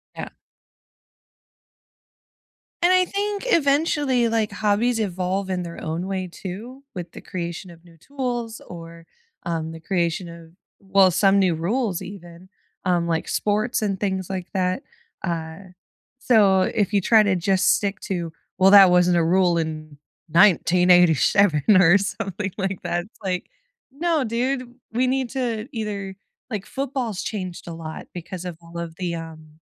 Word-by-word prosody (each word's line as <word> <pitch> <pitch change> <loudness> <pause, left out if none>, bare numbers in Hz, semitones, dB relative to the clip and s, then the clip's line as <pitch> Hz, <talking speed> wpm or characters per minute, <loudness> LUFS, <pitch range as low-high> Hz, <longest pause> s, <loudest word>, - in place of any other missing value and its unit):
Yeah. - - -6 2.5
And 350 +1 +4
I 370 0 +4
think, 405 +1 -3
eventually, 285 - +2
like, 225 -2 0
hobbies 215 +3 +1
evolve 190 -1 -2
in 180 -1 -2
their 170 -1 -8
own 165 +3 -3
way, 190 -1 -3
too, 220 +10 -8
with 175 -1 -7
the - - -11
creation 175 0 -6
of 165 0 -17
new 170 -1 -18
tools 240 - -4
or, 165 -1 -10 0.4
um, 160 -1 -3
the 165 - -9
creation 170 0 -1
of 170 -1 -12 0.3
well, 195 -1 +4
some 195 +3 +4
new 185 -4 +2
rules 195 +3 -1
even, 180 -2 -11 0.3
um, 175 -2 +1
like 165 -1 -1
sports 215 +4 0
and 195 -3 -1
things 190 -3 -2
like 185 -2 -4
that, 185 +5 0 0.4
uh, 160 -2 -4 0.6
so 205 -7 +4
if 205 +1 0
you 200 - +3
try 220 +4 +5
to 205 -2 +2
just 185 +2 +3
stick 200 -2 -2
to, 170 -4 -4 0.2
"Well, 190 +1 +5
that 195 -2 +9
wasn't 180 0 +4
a 170 - +3
rule 175 +1 +3
in 155 -2 -4 0.3
1987," 180 -2 +4 0.2
or 175 +3 +6
something 200 0 -3
like 190 -2 -2
that. 175 0 -2
It's 215 - -24
like, 185 -2 -3 0.4
"No, 315 +1 0
dude, 245 +2 -2 0.2
we 250 +3 +1
need 260 -1 0
to 240 -3 -3
either" 205 -4 -4 0.4
Like, 210 -3 -4
football's 260 -7 -3
changed 185 -6 -5
a 170 - -5
lot 160 -1 -8
because 180 +1 -7
of 175 -3 -6
all 170 0 -11
of 165 -1 -6
the, 175 -2 -3
um 160 -1 -10
190 Hz, 150 wpm, -23 LUFS, 170-220 Hz, 2.5 s, that